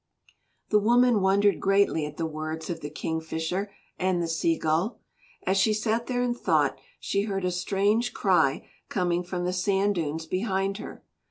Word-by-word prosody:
The 210 - +4
woman 240 0 +4
wondered 200 +1 +3
greatly 195 -6 +2
at 150 - -10
the 165 - -1
words 155 +1 -4
of 165 - -4
the 145 - -6
Kingfisher 160 +5 -3 0.3
and 185 -1 +1
the 170 - -1
Sea 165 0 +1
Gull. 160 +8 0 0.5
As 190 +1 +2
she 215 +2 +3
sat 225 +2 -1
there 245 -1 0
in 245 -1 +1
thought 240 - +1 0.2
she 200 +1 -1
heard 195 -3 -2
a 180 - +1
strange 200 +5 +1
cry - - +2 0.2
coming 175 -2 0
from 175 0 -3
the 180 - -1
sand 195 +2 +1
dunes 160 -2 -3
behind 195 +2 -1
her. - - -9
190 Hz, 170 wpm, -27 LUFS, 165-205 Hz, 0.5 s, The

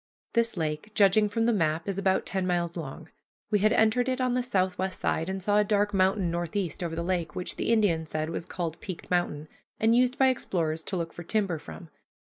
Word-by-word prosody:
This 230 -3 +1
lake, 155 +4 -2
judging 205 +1 +5
from 225 +2 0
the 235 - +3
map, 160 -3 0
is 195 -1 -1
about 190 -1 +1
ten 190 -1 -1
miles 175 -1 0
long. 160 0 -7 0.4
We 210 - +3
had 215 +2 +3
entered 235 +3 +3
it 255 0 -1
on 255 -1 +1
the 250 - +1
southwest 190 -5 -1
side, 160 +3 0
and 190 -1 -3
saw 205 +2 +3
a - - +5
dark 205 0 +1
mountain 190 -1 +2
northeast 175 +1 -2
over 165 -1 -3
the 170 - -2
lake 175 -3 -2
which 180 - -3
the - - -1
Indian 185 -8 +2
said 155 +1 -3
was 170 +1 -5
called 170 -4 -4
Peaked 185 -2 -7
Mountain, 160 -4 0 0.3
and 225 +1 +4
used 250 +1 +3
by 265 -1 +5
explorers 165 -10 -1
to 190 - -2
look 165 -1 -3
for - - -8
timber 180 -2 -1
from. 165 +2 -11
185 Hz, 220 wpm, -28 LUFS, 170-215 Hz, 0.4 s, judging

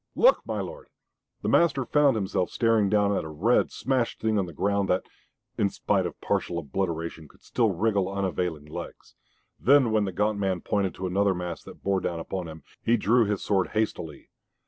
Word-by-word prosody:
"Look, - - +5
my - - -2
lord!" - - -8 0.6
The - - -1
master 140 -6 +3
found 145 -1 +3
himself 95 -3 -1
staring 115 -4 +2
down 100 0 +2
at - - -1
a - - -6
red, 95 +11 +2
smashed 130 -3 -1
thing 110 -1 +1
on 95 - -1
the - - -8
ground 100 +3 0
that, 90 - +2 0.6
in 100 - +3
spite - - 0
of - - -10
partial 85 - -1
obliteration, 85 0 -3
could - - -24
still 115 -3 +1
wriggle 100 0 0
unavailing 90 -5 -2
legs. 75 - -9 0.5
Then 135 -2 +5
when 110 -1 +2
the 95 - -3
gaunt 105 +3 0
man 95 -3 0
pointed 100 -5 -1
to 95 - -5
another 95 +1 +2
mass 90 -1 -5
that - - -13
bore 100 -1 +1
down 85 -1 -2
upon 90 +1 -4
them, 80 0 -10 0.2
he 120 +1 +3
drew 115 +2 +3
his 105 -1 -2
sword 95 -3 +1
hastily. 105 -8 -3
100 Hz, 190 wpm, -26 LUFS, 90-110 Hz, 0.6 s, Look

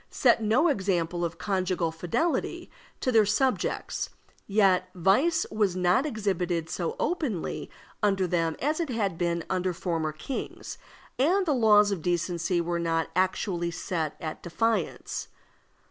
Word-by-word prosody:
set 235 -3 +3
no 225 +10 +3
example 180 - 0
of 170 -1 -3
conjugal 185 -3 0
fidelity 175 - -2 0.3
to 255 - 0
their 225 -2 +6
subjects, 250 +6 0 0.4
yet 195 -3 +3
vice 265 - +3
was 205 -4 +1
not 185 +10 +2
exhibited 180 - -1
so 170 -2 -2
openly 290 - -2 0.3
under 195 -3 +2
them 165 -2 0
as 305 +4 0
it 330 -4 -1
had 210 -7 -1
been 170 0 -1
under 185 -1 0
former 165 -3 -2
kings, 155 - -6 0.4
and 365 +8 +3
the 305 - +2
laws 210 -4 +5
of 190 -5 -2
decency 175 +1 0
were 170 0 -1
not 165 -1 0
actually 185 -1 0
set 165 -2 -3
at 155 -1 -5
defiance. 205 +1 -1
185 Hz, 135 wpm, -27 LUFS, 170-220 Hz, 0.4 s, their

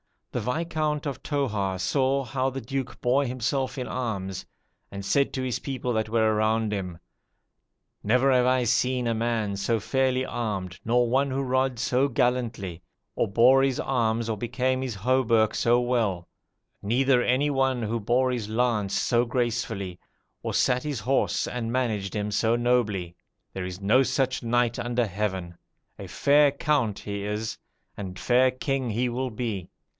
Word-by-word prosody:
The - - -2
Viscount 155 +2 -1
of 140 -3 -4
Toarz 105 -10 -1
saw 135 +5 +1
how 130 +2 -1
the 135 0 -5
Duke 130 +2 -4
bore 130 +3 +2
himself 130 +2 -2
in 125 - -3
arms, 100 -8 -4 0.4
and 100 0 -7
said 140 +6 +2
to 130 - -2
his 125 -2 -2
people 130 -2 -3
that 110 -1 0
were 110 -1 +2
around 110 0 +1
him, 90 -5 -4 1.0
'Never 125 +5 +3
have 125 -1 +4
I 130 0 +3
seen 125 +1 +1
a 115 - +1
man 110 -3 -1
so 110 +3 0
fairly 130 +3 +1
armed, 95 -8 -4
nor 120 +1 +3
one 135 +4 +2
who 135 +1 -1
rods 130 -2 0
so 130 +3 +2
gallantly, 120 -9 -1 0.3
or - - 0
bore 125 +6 +5
his 135 -2 +1
arms 115 -3 0
or 110 - -1
became 125 +3 -1
his 130 -4 -3
hauberk 115 0 +2
so 120 +1 +3
well; 110 -8 -1 0.5
neither 125 +4 +3
any 130 +4 +2
one 135 -3 +1
who 115 +2 -1
bore 125 +4 +1
his 120 -4 -3
lance 110 -3 0
so 120 0 +2
gracefully, 115 -6 -2 0.4
or - - -3
sat 125 0 +2
his 145 -6 -4
horse 135 +6 +1
and 115 -2 -3
managed 110 -7 -1
him 105 0 -2
so 110 +2 +2
nobly. 110 -8 0 0.4
There 95 -1 -4
is 90 +1 -7
no 110 +7 +4
such 130 -1 0
knight 120 0 +1
under 120 0 0
heaven! 95 -4 -3 0.4
a - - -7
fair 145 0 +4
count 140 -7 0
he 100 -1 -5
is, 105 +2 -3 0.4
and 95 -3 -6
fair 125 +4 +3
king 130 -1 -2
he 120 +4 0
will 130 +2 -2
be. 110 -6 -4
120 Hz, 165 wpm, -26 LUFS, 105-130 Hz, 1.0 s, bore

